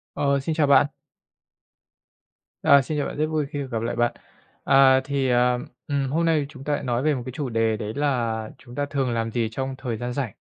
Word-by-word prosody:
Ờ, 140 Hz, -1 st, +1 dB
xin 155 Hz, +4 st, -2 dB
chào 155 Hz, -2 st, +2 dB
bạn! 140 Hz, 0 st, +6 dB, 1.8 s
À, 140 Hz, -1 st, +6 dB
xin 150 Hz, +2 st, -3 dB
chào 145 Hz, -, 0 dB
bạn, -, -, -6 dB
rất 155 Hz, +1 st, +1 dB
vui 155 Hz, -2 st, -1 dB
khi 145 Hz, -, -6 dB
được 140 Hz, -2 st, -4 dB
gặp 115 Hz, -2 st, -2 dB
lại 115 Hz, 0 st, -2 dB
bạn! 120 Hz, 0 st, +2 dB, 0.5 s
À, 135 Hz, -1 st, +6 dB
thì, 135 Hz, -2 st, 0 dB, 0.6 s
ừm, 140 Hz, -2 st, -1 dB
hôm 165 Hz, +4 st, +1 dB
nay 160 Hz, -2 st, +3 dB
thì 140 Hz, -, -3 dB
chúng 135 Hz, -2 st, -12 dB
ta 150 Hz, -, -1 dB
lại -, -, -3 dB
nói 120 Hz, -1 st, 0 dB
về 155 Hz, 0 st, +2 dB
một 125 Hz, -, -4 dB
cái 130 Hz, -, -5 dB
chủ 135 Hz, +1 st, -4 dB
đề 115 Hz, -1 st, +1 dB
đấy 105 Hz, 0 st, -5 dB
là 115 Hz, -6 st, -1 dB
chúng 120 Hz, -, -14 dB
ta 145 Hz, +1 st, -1 dB
thường 135 Hz, -3 st, -1 dB
làm 115 Hz, -1 st, -1 dB
gì 115 Hz, -1 st, -1 dB
trong 135 Hz, +3 st, -4 dB
thời 120 Hz, -4 st, -3 dB
gian 120 Hz, +2 st, -4 dB
rảnh. 125 Hz, -5 st, -3 dB
135 Hz, 235 wpm, -24 LUFS, 120-145 Hz, 1.8 s, bạn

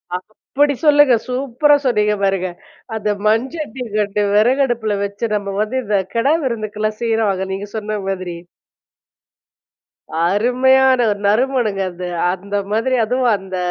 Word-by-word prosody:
அப்பிடி 270 Hz, +9 st, -1 dB
சொல்லுங்க. 290 Hz, -3 st, +6 dB
சூப்பரா 265 Hz, +3 st, +2 dB
சொன்னீங்க 210 Hz, -3 st, +2 dB
பாருங்க. 190 Hz, -2 st, +1 dB, 0.5 s
அந்த 215 Hz, -1 st, -2 dB, 0.2 s
மண் 225 Hz, +4 st, +2 dB
சட்டி 270 Hz, -6 st, -5 dB
கண்டு 205 Hz, 0 st, 0 dB
விறகடுப்பில 235 Hz, -2 st, +2 dB
வச்சு 200 Hz, +3 st, -4 dB
நம்ம 200 Hz, -1 st, -3 dB
வந்து 215 Hz, +5 st, -2 dB
இந்த 205 Hz, -1 st, +1 dB, 0.2 s
கிடா 260 Hz, +6 st, +3 dB
விருந்துக்கலாம் 215 Hz, -3 st, -3 dB
செய்வாங்க. 220 Hz, -5 st, 0 dB
நீங்க 200 Hz, +2 st, -5 dB
சொன்ன 215 Hz, -1 st, -3 dB
மாதிரி. 185 Hz, -2 st, -4 dB, 1.9 s
அருமையான 255 Hz, +5 st, +3 dB
ஒரு 205 Hz, -, -3 dB
நறுமணங்க 225 Hz, -2 st, +1 dB
அது. 180 Hz, +1 st, -6 dB, 0.3 s
அந்த 200 Hz, +2 st, -6 dB, 0.2 s
மாதிரி 230 Hz, +4 st, +1 dB
அதுவும் 250 Hz, +1 st, +1 dB
அந்த 190 Hz, -1 st, -7 dB
215 Hz, 125 wpm, -18 LUFS, 200-255 Hz, 1.9 s, சொல்லுங்க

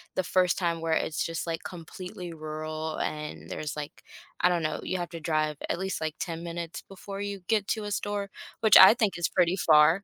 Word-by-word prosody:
the 185 Hz, -, +1 dB
first 180 Hz, -1 st, +2 dB
time 170 Hz, -2 st, 0 dB
where 165 Hz, -1 st, 0 dB
it's 160 Hz, -, 0 dB
just, 165 Hz, 0 st, -4 dB
like, 165 Hz, -1 st, -3 dB
completely 180 Hz, +1 st, -8 dB
rural, 155 Hz, 0 st, -5 dB
and 150 Hz, 0 st, -4 dB
there's, 150 Hz, -2 st, -4 dB
like, 150 Hz, -1 st, -7 dB, 0.4 s
I 180 Hz, -, +4 dB
don't 175 Hz, -1 st, +1 dB
know, 155 Hz, -1 st, -2 dB
you 185 Hz, -, -2 dB
have 175 Hz, -, -3 dB
to 165 Hz, -, -7 dB
drive 155 Hz, -1 st, 0 dB
at 175 Hz, -, -1 dB
least, 190 Hz, 0 st, -2 dB
like, 155 Hz, -1 st, -2 dB
10 170 Hz, -1 st, -4 dB
minutes 170 Hz, -1 st, -5 dB
before 195 Hz, +1 st, -8 dB
you 200 Hz, -1 st, -4 dB
get 215 Hz, -3 st, +2 dB
to 215 Hz, -2 st, -1 dB
a 205 Hz, -, -4 dB
store, 205 Hz, -1 st, -2 dB, 0.3 s
which 220 Hz, -3 st, +7 dB
I 190 Hz, +3 st, +11 dB
think 215 Hz, -7 st, 0 dB
is 175 Hz, -, +1 dB
pretty 180 Hz, 0 st, +2 dB
far, 160 Hz, +3 st, +5 dB
170 Hz, 215 wpm, -28 LUFS, 155-190 Hz, 0.4 s, I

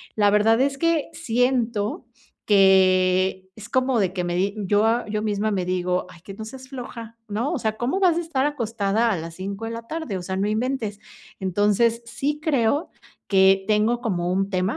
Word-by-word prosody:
la 205 Hz, -1 st, +4 dB
verdad 220 Hz, +3 st, +4 dB
es 275 Hz, 0 st, +1 dB
que 330 Hz, -1 st, +1 dB
siento 235 Hz, -2 st, 0 dB, 0.4 s
que 190 Hz, -1 st, +3 dB
es 220 Hz, +1 st, -11 dB
como 255 Hz, -1 st, +1 dB
de 190 Hz, -3 st, +1 dB
que 180 Hz, -2 st, -2 dB
me 175 Hz, 0 st, -2 dB
di 195 Hz, +3 st, 0 dB
yo 220 Hz, +4 st, +2 dB
yo 210 Hz, 0 st, -2 dB
misma 210 Hz, 0 st, -1 dB
me 190 Hz, -2 st, -1 dB
digo: 180 Hz, 0 st, -1 dB
"Ay, 170 Hz, -, -15 dB
que 195 Hz, -, -9 dB
no 215 Hz, +2 st, -8 dB
seas 260 Hz, +3 st, -10 dB
floja, 235 Hz, -3 st, -8 dB
¿no? 225 Hz, +8 st, -2 dB
O 295 Hz, -, -2 dB
sea, 220 Hz, -1 st, -2 dB
¿cómo 255 Hz, -, -1 dB
vas 345 Hz, -3 st, +4 dB
a -, -, +1 dB
estar 290 Hz, -5 st, -1 dB
acostada 230 Hz, -5 st, 0 dB
a 195 Hz, -, 0 dB
las 165 Hz, +1 st, -7 dB
5 195 Hz, +4 st, -5 dB
de 225 Hz, -, -4 dB
la 230 Hz, 0 st, -6 dB
tarde? 315 Hz, -, -4 dB
O -, -, -6 dB
sea, 190 Hz, +1 st, -4 dB
no 200 Hz, -, 0 dB
inventes," 220 Hz, -2 st, -2 dB, 0.4 s
entonces, 205 Hz, +5 st, +1 dB
sí 290 Hz, +5 st, -3 dB
creo 285 Hz, -1 st, +1 dB, 0.4 s
que 195 Hz, 0 st, +4 dB
tengo 220 Hz, +3 st, +2 dB
como 180 Hz, -6 st, -1 dB
un 195 Hz, +1 st, 0 dB
tema 185 Hz, +1 st, -1 dB
215 Hz, 195 wpm, -23 LUFS, 195-245 Hz, 0.4 s, la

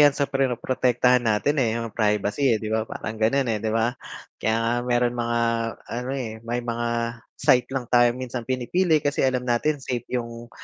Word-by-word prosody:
'yan 145 Hz, -1 st, +8 dB
sa 140 Hz, -, +1 dB
protektahan 125 Hz, -2 st, +2 dB
natin, 110 Hz, +5 st, +1 dB
eh, 115 Hz, -2 st, +1 dB
'yung 115 Hz, -2 st, -4 dB
privacy, 105 Hz, +3 st, +2 dB
eh, -, -, -4 dB
di 110 Hz, -, -6 dB
ba 110 Hz, 0 st, +1 dB
parang 110 Hz, -, -5 dB
gano'n, 130 Hz, +4 st, +2 dB
eh, 110 Hz, -2 st, 0 dB
di 110 Hz, -, 0 dB
ba? 115 Hz, +2 st, +1 dB, 0.5 s
Kaya 110 Hz, 0 st, +2 dB
nga 115 Hz, +1 st, 0 dB
meron 120 Hz, 0 st, +1 dB
mga 120 Hz, 0 st, -1 dB, 0.5 s
ano, 125 Hz, +2 st, -4 dB
eh, 110 Hz, -3 st, -5 dB
may 120 Hz, +1 st, -2 dB
mga 120 Hz, 0 st, -2 dB, 0.5 s
site 125 Hz, 0 st, +3 dB
lang 130 Hz, -3 st, -2 dB
tayo 120 Hz, -1 st, +5 dB
minsan 125 Hz, -1 st, -4 dB
pinipili, 155 Hz, +7 st, +1 dB
kasi 145 Hz, 0 st, 0 dB
alam 125 Hz, -1 st, 0 dB
natin 140 Hz, +5 st, +1 dB
safe 125 Hz, -2 st, -3 dB
'yung, 120 Hz, -1 st, -4 dB
120 Hz, 185 wpm, -24 LUFS, 115-130 Hz, 0.5 s, yan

